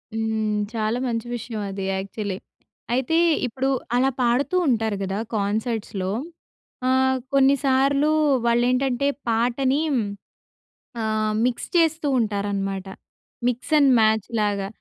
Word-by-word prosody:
హ్మ్. 220 Hz, -1 st, -1 dB
చాలా 220 Hz, +1 st, -1 dB
మంచి 230 Hz, -1 st, -2 dB
విషయం 225 Hz, -2 st, -5 dB
అది 195 Hz, 0 st, -5 dB
యాక్చువల్లీ. 195 Hz, 0 st, -4 dB, 0.6 s
అయితే 260 Hz, +6 st, +1 dB, 0.3 s
ఇప్పుడు 260 Hz, +3 st, -2 dB, 0.3 s
అలా 260 Hz, +2 st, +3 dB
పాడుతూ 250 Hz, +7 st, +1 dB
ఉంటారు 225 Hz, -4 st, +1 dB
కదా 190 Hz, +1 st, -2 dB, 0.2 s
కాన్సర్ట్స్‌లో. 210 Hz, -2 st, -2 dB, 0.8 s
ఆహ్, 260 Hz, 0 st, +3 dB, 0.2 s
కొన్నిసార్లు 275 Hz, +1 st, +3 dB, 0.4 s
వాళ్ళు 235 Hz, 0 st, +3 dB
ఏంటంటే 255 Hz, +1 st, +1 dB, 0.2 s
పాటని 250 Hz, +5 st, +1 dB
హ్మ్, 240 Hz, -4 st, +1 dB, 1.0 s
ఆహ్, 215 Hz, -1 st, 0 dB
మిక్స్ 245 Hz, -1 st, -1 dB
చేస్తూ 320 Hz, -2 st, +2 dB
ఉంటారనమాట. 200 Hz, -3 st, -2 dB, 0.6 s
మిక్స్ 250 Hz, +5 st, -2 dB
అండ్ 280 Hz, -2 st, +5 dB
మ్యాచ్ 220 Hz, -1 st, +2 dB
లాగా. 200 Hz, -2 st, 0 dB
230 Hz, 110 wpm, -23 LUFS, 210-260 Hz, 1.0 s, అండ్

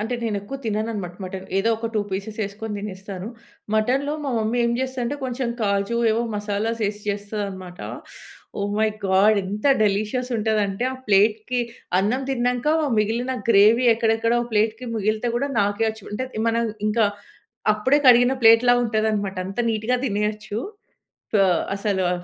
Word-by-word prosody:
అంటే 225 Hz, +4 st, -2 dB
నేను 220 Hz, -3 st, -1 dB
ఎక్కువ 210 Hz, +8 st, -7 dB
తినను 215 Hz, 0 st, -1 dB
అనమాట. 180 Hz, -4 st, -5 dB
మటన్ 185 Hz, 0 st, -6 dB
ఏదో 220 Hz, +4 st, +2 dB
ఒక 225 Hz, +1 st, -3 dB
2 215 Hz, -, +2 dB
పీసెస్ 200 Hz, +3 st, -5 dB
వేసుకొని 210 Hz, +2 st, -5 dB
తినేస్తాను. 195 Hz, -1 st, -7 dB, 0.5 s
మటన్‍లో 265 Hz, +7 st, +1 dB
మా 275 Hz, -, -1 dB
మమ్మీ 220 Hz, +2 st, 0 dB
ఏం 235 Hz, -, +1 dB
చేస్తాదంటే, 260 Hz, +1 st, -2 dB
కొంచెం 250 Hz, -1 st, -2 dB
కాజు 200 Hz, +2 st, 0 dB
ఏవో 230 Hz, +2 st, +1 dB
మసాలాస్ 210 Hz, +2 st, -2 dB
ఏసి 210 Hz, 0 st, -7 dB
చేస్తదనమాట. 200 Hz, -3 st, -5 dB, 0.8 s
ఓహ్! 205 Hz, 0 st, -1 dB
మై 220 Hz, -, +3 dB, 0.2 s
గాడ్ 200 Hz, +3 st, +4 dB
ఎంత 205 Hz, +7 st, -3 dB, 0.2 s
డెలీషియస్ 215 Hz, +5 st, 0 dB
ఉంటదంటే 210 Hz, 0 st, 0 dB
ఆ -, -, -5 dB
ప్లేట్‍కి 215 Hz, +4 st, +3 dB, 0.4 s
అన్నం 230 Hz, +7 st, +1 dB
తిన్నాంకా 250 Hz, +3 st, +1 dB, 0.3 s
మిగిలిన 235 Hz, +5 st, 0 dB
గ్రేవీ 220 Hz, +4 st, +6 dB
ఎక్కడెక్కడో 225 Hz, +1 st, +1 dB
ప్లేట్‌కి 220 Hz, +3 st, 0 dB
మిగిలితే 215 Hz, +2 st, 0 dB
కూడా 280 Hz, +3 st, -1 dB
నాకేయొచ్చు. 220 Hz, +1 st, -1 dB
అంటే 255 Hz, +5 st, -2 dB, 0.2 s
మనం 230 Hz, +1 st, +1 dB, 0.2 s
ఇంకా 215 Hz, 0 st, +3 dB, 0.7 s
అప్పుడే 260 Hz, +7 st, +2 dB
కడిగిన 245 Hz, +1 st, +6 dB
ప్లేట్‌లా 230 Hz, +2 st, +7 dB
ఉంటదనమాట. 215 Hz, -3 st, 0 dB
అంత 195 Hz, +3 st, -8 dB
నీట్‌గా 225 Hz, +3 st, 0 dB
తినేయొచ్చు. 210 Hz, 0 st, -2 dB, 0.9 s
ఆ! -, -, +4 dB, 0.3 s
అసలా 195 Hz, -3 st, 0 dB
215 Hz, 140 wpm, -23 LUFS, 205-235 Hz, 0.9 s, ప్లేట్‌లా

